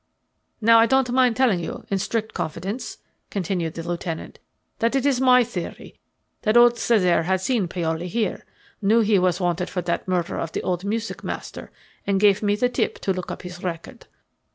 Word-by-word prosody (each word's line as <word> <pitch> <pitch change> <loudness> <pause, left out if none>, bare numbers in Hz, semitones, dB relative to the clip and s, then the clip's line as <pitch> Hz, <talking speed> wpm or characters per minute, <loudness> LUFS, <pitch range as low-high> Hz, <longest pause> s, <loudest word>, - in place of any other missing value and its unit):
"Now 230 +1 +6
I 225 - +5
don't 265 -1 +2
mind 250 -2 +3
telling 250 -8 +3
you 170 - -6
in 195 - 0
strict 220 +2 -2
confidence," 190 +10 -4 0.3
continued 175 -4 -2
the 165 0 -6
lieutenant, 170 -1 -5 0.4
"that 230 +3 +1
it's 270 -1 +2
my 250 -1 +6
theory 200 -7 -7 0.4
that 215 +1 +3
old 240 0 +6
Cesare 185 -8 +3
had 190 +3 0
seen 205 -1 0
Paoli 170 -1 -2
here, 220 +4 -2 0.4
knew 215 +3 +4
he 210 -2 +3
was 180 0 +1
wanted 180 0 -1
for 180 -2 -3
that 170 +2 -2
murder 180 -2 -1
of 165 - -4
the - - -3
old 180 -1 -1
music 225 +2 -3
master, - - -6 0.4
and 195 -1 +2
gave 205 -1 +4
me 205 -1 +2
the 245 +4 +2
tip 245 - -1
to 190 - 0
look 185 -1 -5
up - - -6
his 180 0 -8
record. 180 +7 -6
195 Hz, 185 wpm, -23 LUFS, 180-230 Hz, 0.4 s, Now